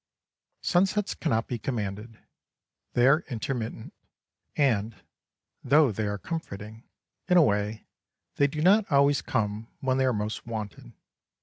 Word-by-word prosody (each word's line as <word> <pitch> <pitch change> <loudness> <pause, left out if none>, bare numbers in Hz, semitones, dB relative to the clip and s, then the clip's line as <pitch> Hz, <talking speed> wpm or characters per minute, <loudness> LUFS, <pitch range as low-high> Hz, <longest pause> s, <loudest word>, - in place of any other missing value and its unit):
Sunsets 195 +3 +1
cannot 115 -9 -1
be 120 - -4
commanded; 110 -2 -4 0.8
they 120 - +3
are 150 +5 +5
intermittent, 115 -2 -4 0.6
and, 115 -6 +1 0.7
though 140 0 +4
they 105 +1 -2
are 100 0 -2
comforting 110 - -7 0.4
in 180 -1 +4
a 170 - +8
way 105 -2 -1 0.5
they 140 - +4
do 150 +2 -3
not 200 +2 +4
always 140 0 +4
come 105 +1 -2
when 130 0 0
they 130 - +3
are 130 - +3
most 105 0 -4
wanted. 110 -4 -6
120 Hz, 130 wpm, -27 LUFS, 105-145 Hz, 0.8 s, a